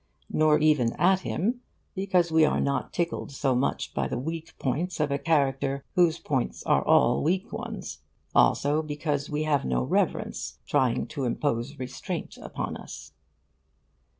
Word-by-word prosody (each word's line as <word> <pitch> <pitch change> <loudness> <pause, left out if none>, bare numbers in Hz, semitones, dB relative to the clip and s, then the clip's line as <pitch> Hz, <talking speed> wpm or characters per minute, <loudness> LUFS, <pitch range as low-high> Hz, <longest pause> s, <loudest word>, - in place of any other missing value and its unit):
(Nor 155 -1 +4
even 150 -7 +3
at 185 +1 +3
him; 230 +7 -2 0.3
because 185 -4 +1
we 160 0 +5
are 150 - +3
not 140 0 -1
tickled 170 -4 -2
so 135 -1 0
much 125 +3 -1
by 70 -1 0
the - - -3
weak 160 +5 -5
points 155 +7 -2
of 150 -1 +1
a 140 - 0
character 140 -3 +1
whose 170 -2 +4
points 135 -7 -2
are - - +2
all - - +4
weak 185 +9 0
ones; 225 -1 -6 0.3
also 145 +2 +3
because 150 -1 -2
we 150 +1 -1
have 150 -3 +1
no 65 -1 0
reverence - - -1
trying 125 -3 +1
to 140 -3 -3
impose 125 +2 -1
restraint 130 -1 -5
upon - - -4
us.) - - -10
150 Hz, 150 wpm, -27 LUFS, 135-170 Hz, 0.3 s, we